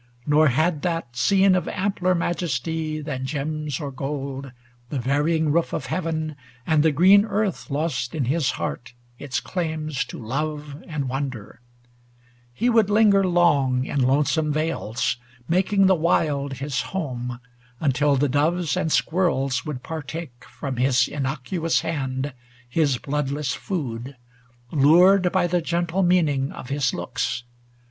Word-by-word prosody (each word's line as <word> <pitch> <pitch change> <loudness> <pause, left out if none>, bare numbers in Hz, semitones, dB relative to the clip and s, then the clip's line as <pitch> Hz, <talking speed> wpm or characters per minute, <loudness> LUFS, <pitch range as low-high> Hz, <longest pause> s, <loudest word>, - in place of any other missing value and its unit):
Nor 155 +1 +4
had 155 +4 +1
that 165 -9 -3
scene 195 +7 +4
of 185 - 0
ampler 185 -2 0
majesty 160 -2 -2
Than 135 -4 -4
gems 150 +1 -3
or 145 -3 -4
gold, 135 0 -5 0.4
the 145 - -3
varying 150 +5 +1
roof 170 +2 +1
of - - -2
heaven 160 -3 -2 0.3
And 155 -2 +3
the 160 +1 +4
green 190 +7 +6
earth, 210 -4 -2
lost 140 -4 -2
in 145 -5 0
his 140 +1 +1
heart 120 0 -5 0.2
its 135 -3 -2
claims 155 -5 -2
To - - -9
love 145 +5 -4
and 150 -5 -3
wonder; 125 -5 -5 0.9
he 225 - -1
would 225 -4 +4
linger 205 -2 +5
long 145 -8 +3
In 140 - -1
lonesome 150 +4 +2
vales, 130 -6 -1 0.3
making 195 +3 +3
the 190 - +6
wild 150 -5 +1
his 135 0 -2
home, 125 -9 -4 0.4
Until 145 0 +2
the 140 +2 +2
doves 155 +5 +1
and 180 -3 -1
squirrels 140 -8 +1
would 135 -4 -5
par 160 -1 -5
take 160 +1 -6
100 - - -17
From 135 -3 -5
his 125 0 +3
innocuous 150 +5 -1
hand 140 -4 -3 0.3
his 140 0 +1
bloodless 145 0 -2
food. 130 -7 -4 0.5
Lured 180 +6 +5
by - - +2
the 175 0 +1
gentle 170 +2 -1
meaning 155 -7 +2
of 125 - -9
his 140 -2 +1
looks. 120 - -3
150 Hz, 140 wpm, -23 LUFS, 135-170 Hz, 0.9 s, green